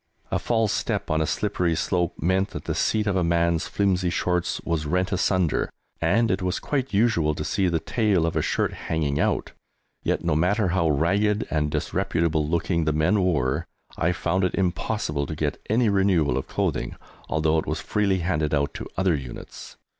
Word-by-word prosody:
A -, -, +1 dB
false 115 Hz, -3 st, +1 dB
step -, -, -2 dB
on 80 Hz, 0 st, +2 dB
a 80 Hz, -, 0 dB
slippery 90 Hz, -2 st, 0 dB
slope 90 Hz, +1 st, 0 dB
meant 95 Hz, +3 st, +2 dB
that -, -, -7 dB
the -, -, -2 dB
seat 110 Hz, -1 st, +1 dB
of 100 Hz, -2 st, 0 dB
a 90 Hz, -, +2 dB
man's 85 Hz, 0 st, +1 dB
flimsy 95 Hz, -3 st, +1 dB
shorts 90 Hz, +1 st, 0 dB
was 80 Hz, -3 st, -2 dB
rent 90 Hz, +4 st, 0 dB
asunder, 95 Hz, -3 st, +1 dB, 0.3 s
and 115 Hz, +2 st, +3 dB
it 95 Hz, 0 st, 0 dB
was 90 Hz, +1 st, -1 dB
quite 135 Hz, -2 st, -2 dB
usual 100 Hz, -8 st, +2 dB
to 75 Hz, -, -4 dB
see 95 Hz, +4 st, 0 dB
the 85 Hz, -2 st, +1 dB
tail 105 Hz, -7 st, +1 dB
of 85 Hz, -, -2 dB
a -, -, +2 dB
shirt -, -, 0 dB
hanging 75 Hz, -3 st, -2 dB
out! -, -, 0 dB, 0.5 s
Yet, -, -, -1 dB
no -, -, +2 dB
matter 95 Hz, +5 st, +2 dB
how 85 Hz, -2 st, +1 dB
ragged 100 Hz, +8 st, +2 dB
and 75 Hz, -1 st, +1 dB
disreputable 80 Hz, +1 st, 0 dB
looking 85 Hz, 0 st, 0 dB
the 75 Hz, -, +1 dB
men 80 Hz, +6 st, +2 dB
were, 70 Hz, -8 st, 0 dB, 0.3 s
I 85 Hz, +1 st, +1 dB
found 90 Hz, +1 st, 0 dB
it 90 Hz, -, +1 dB
impossible 90 Hz, -5 st, -1 dB
to 80 Hz, -, -4 dB
get 75 Hz, -1 st, -2 dB
any 115 Hz, +2 st, +3 dB
renewal 95 Hz, -9 st, +2 dB
of 65 Hz, -, -3 dB
clothing, -, -, -2 dB, 0.3 s
although 80 Hz, 0 st, +2 dB
it -, -, -5 dB
was -, -, -1 dB
freely 100 Hz, -3 st, 0 dB
handed 80 Hz, -4 st, 0 dB
out 70 Hz, 0 st, 0 dB
to -, -, -6 dB
other 95 Hz, -2 st, +2 dB
units. 65 Hz, -5 st, -7 dB
90 Hz, 190 wpm, -25 LUFS, 80-95 Hz, 0.5 s, and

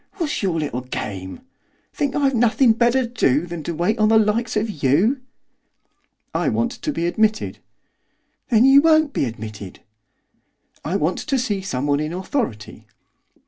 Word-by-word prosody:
What's 330 Hz, -7 st, -3 dB
your 180 Hz, -5 st, 0 dB
little 140 Hz, -5 st, -3 dB
game? 95 Hz, -7 st, -6 dB, 0.5 s
Think 285 Hz, -2 st, -2 dB
I've 275 Hz, -2 st, +2 dB
nothing 240 Hz, 0 st, +3 dB
better 240 Hz, +3 st, +2 dB
to -, -, -6 dB
do 160 Hz, -, +1 dB
than 170 Hz, -2 st, -6 dB
to 170 Hz, -, -3 dB
wait 180 Hz, +8 st, 0 dB
upon 215 Hz, -1 st, +3 dB
the 220 Hz, -, +5 dB
likes 220 Hz, +2 st, +1 dB
of 210 Hz, -8 st, -3 dB
you?' 190 Hz, -, +2 dB, 1.1 s
'I -, -, 0 dB
want 235 Hz, +1 st, 0 dB
to 300 Hz, -, -4 dB
be 170 Hz, -, -2 dB
admitted.' 215 Hz, +4 st, 0 dB, 0.9 s
'Then 235 Hz, 0 st, +4 dB
you 270 Hz, +1 st, +7 dB
won't 315 Hz, -2 st, +3 dB
be -, -, 0 dB
admitted!' 110 Hz, -5 st, -8 dB, 1.0 s
'I 170 Hz, -, -2 dB
want 165 Hz, -1 st, 0 dB
to 275 Hz, -3 st, -1 dB
see 210 Hz, -6 st, -1 dB
someone 145 Hz, -5 st, -1 dB
in 155 Hz, +2 st, -3 dB
authority. 180 Hz, -, -4 dB
210 Hz, 155 wpm, -21 LUFS, 150-245 Hz, 1.1 s, you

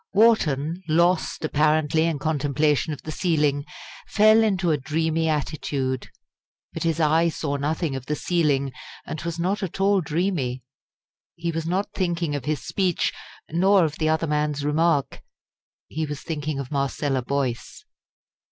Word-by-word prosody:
Wharton, 175 Hz, -7 st, +3 dB
lost 170 Hz, +1 st, +2 dB
apparently 155 Hz, +1 st, +2 dB
in 165 Hz, -3 st, 0 dB
contemplation 150 Hz, +1 st, +1 dB
of 145 Hz, -, -7 dB
the 155 Hz, -, -5 dB
ceiling, 150 Hz, -4 st, +1 dB, 0.4 s
fell 215 Hz, +1 st, +5 dB
into 190 Hz, -6 st, +1 dB
a 150 Hz, -, +2 dB
dreamy 160 Hz, +3 st, 0 dB
attitude. 140 Hz, -3 st, -2 dB, 0.6 s
But -, -, -5 dB
his 165 Hz, -1 st, 0 dB
eye 160 Hz, +2 st, +3 dB
saw 145 Hz, -3 st, -2 dB
nothing 150 Hz, +1 st, -1 dB
of 130 Hz, 0 st, -7 dB
the 150 Hz, -, 0 dB
ceiling, 145 Hz, -6 st, +1 dB, 0.3 s
and 155 Hz, -, -5 dB
was 170 Hz, 0 st, -4 dB
not 190 Hz, +5 st, -1 dB
at 190 Hz, -1 st, -4 dB
all 195 Hz, 0 st, +3 dB
dreamy. 150 Hz, -7 st, -1 dB, 0.7 s
He 170 Hz, 0 st, -2 dB
was 165 Hz, 0 st, -3 dB
not 190 Hz, +4 st, -1 dB
thinking 170 Hz, -4 st, -1 dB
of 145 Hz, -3 st, -3 dB
his 150 Hz, 0 st, -2 dB
speech, 185 Hz, -4 st, 0 dB, 0.4 s
nor 190 Hz, +2 st, +4 dB
of 155 Hz, 0 st, -4 dB
the 155 Hz, -1 st, +1 dB
other 160 Hz, +1 st, +1 dB
man's 150 Hz, -1 st, -1 dB
remark. 150 Hz, -1 st, +1 dB, 0.7 s
He 155 Hz, 0 st, -3 dB
was 150 Hz, -1 st, -5 dB
thinking 155 Hz, -3 st, -3 dB
of 135 Hz, -2 st, -5 dB
Marcella 140 Hz, -1 st, 0 dB
Boyce. 130 Hz, -2 st, -3 dB
155 Hz, 150 wpm, -24 LUFS, 145-170 Hz, 0.7 s, fell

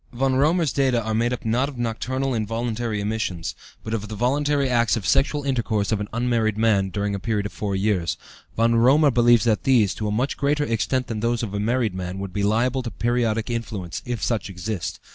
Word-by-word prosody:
Von 130 Hz, +1 st, 0 dB
Römer's 155 Hz, +3 st, +2 dB
data 130 Hz, -3 st, +2 dB
are 110 Hz, 0 st, -2 dB
made 115 Hz, +2 st, +1 dB
up 125 Hz, -1 st, -4 dB
not 125 Hz, +5 st, +1 dB
of 135 Hz, -, -10 dB
nocturnal 130 Hz, +3 st, -2 dB
involuntary 115 Hz, 0 st, -2 dB
emissions, 100 Hz, -5 st, -2 dB, 0.3 s
but 110 Hz, -, -5 dB
of 105 Hz, -1 st, -2 dB
the 110 Hz, -, -6 dB
voluntary 140 Hz, +4 st, +1 dB
acts 120 Hz, -2 st, +2 dB
of 105 Hz, -, -5 dB
sexual 145 Hz, +1 st, +2 dB
intercourse 115 Hz, -6 st, 0 dB
of 110 Hz, -, +1 dB
an 105 Hz, -, -3 dB
unmarried 115 Hz, -3 st, 0 dB
man, 105 Hz, -4 st, +2 dB
during 100 Hz, +1 st, -2 dB
a 100 Hz, -, -2 dB
period 105 Hz, 0 st, -1 dB
of 100 Hz, -, -5 dB
four 100 Hz, -2 st, -3 dB
years. 95 Hz, -4 st, 0 dB, 0.4 s
Von 115 Hz, +1 st, +3 dB
Römer 135 Hz, +5 st, +5 dB
believes 120 Hz, -2 st, +5 dB
that 110 Hz, -3 st, +2 dB
these, 120 Hz, -8 st, +3 dB
to 105 Hz, -, -4 dB
a -, -, -1 dB
much 125 Hz, +6 st, -1 dB
greater 145 Hz, +1 st, +1 dB
extent 125 Hz, +1 st, 0 dB
than 115 Hz, -2 st, -4 dB
those 115 Hz, +1 st, 0 dB
of 105 Hz, -3 st, -4 dB
a 100 Hz, -, -2 dB
married 115 Hz, 0 st, 0 dB
man, 90 Hz, 0 st, -5 dB
would 95 Hz, -1 st, -6 dB
be 100 Hz, -, -1 dB
liable 120 Hz, +6 st, +1 dB
to 120 Hz, -, -4 dB
periodic 115 Hz, -1 st, 0 dB
influence, 105 Hz, -8 st, -4 dB
if 120 Hz, -5 st, -4 dB
such 110 Hz, -2 st, -1 dB
exist. 95 Hz, +1 st, -4 dB
115 Hz, 215 wpm, -23 LUFS, 105-125 Hz, 0.4 s, Römer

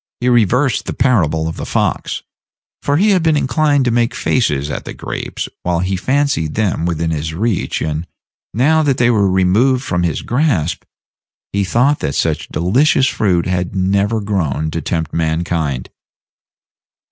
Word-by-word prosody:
He 125 Hz, -, +1 dB
reversed 125 Hz, +3 st, +2 dB
the -, -, -3 dB
parable 80 Hz, -, +2 dB
of 80 Hz, -, -5 dB
the -, -, -5 dB
fox; -, -, -1 dB, 0.6 s
for 145 Hz, 0 st, +1 dB
he 205 Hz, +5 st, +3 dB
had 185 Hz, -3 st, +3 dB
been 160 Hz, -2 st, +2 dB
inclined 145 Hz, -1 st, +2 dB
to 120 Hz, -, +2 dB
make 120 Hz, 0 st, +1 dB
faces 75 Hz, -, 0 dB
at -, -, -4 dB
the -, -, -8 dB
grapes -, -, -5 dB
while 90 Hz, -1 st, 0 dB
he 90 Hz, +3 st, -1 dB
fancied 130 Hz, -, 0 dB
them 95 Hz, -6 st, 0 dB
within 85 Hz, -1 st, -1 dB
his 80 Hz, 0 st, -3 dB
reach, 110 Hz, +1 st, -1 dB
and, 80 Hz, +2 st, -3 dB, 0.4 s
now 155 Hz, +8 st, +3 dB
that 140 Hz, -4 st, +1 dB
they 120 Hz, 0 st, +3 dB
were 100 Hz, -4 st, +2 dB
removed 105 Hz, +8 st, +2 dB
from 90 Hz, -9 st, -1 dB
his 85 Hz, -3 st, -1 dB
grasp, 120 Hz, -, 0 dB, 0.7 s
he 100 Hz, 0 st, +1 dB
thought 125 Hz, +9 st, +2 dB
that 70 Hz, -, -2 dB
such 80 Hz, -3 st, -1 dB
delicious 130 Hz, -, +2 dB
fruit 95 Hz, -9 st, +1 dB
had 90 Hz, 0 st, -2 dB
never 100 Hz, +4 st, +1 dB
grown 80 Hz, -7 st, -1 dB
to 80 Hz, -, -3 dB
tempt 80 Hz, +1 st, -3 dB
mankind. 80 Hz, -4 st, -1 dB
95 Hz, 160 wpm, -17 LUFS, 80-125 Hz, 0.7 s, he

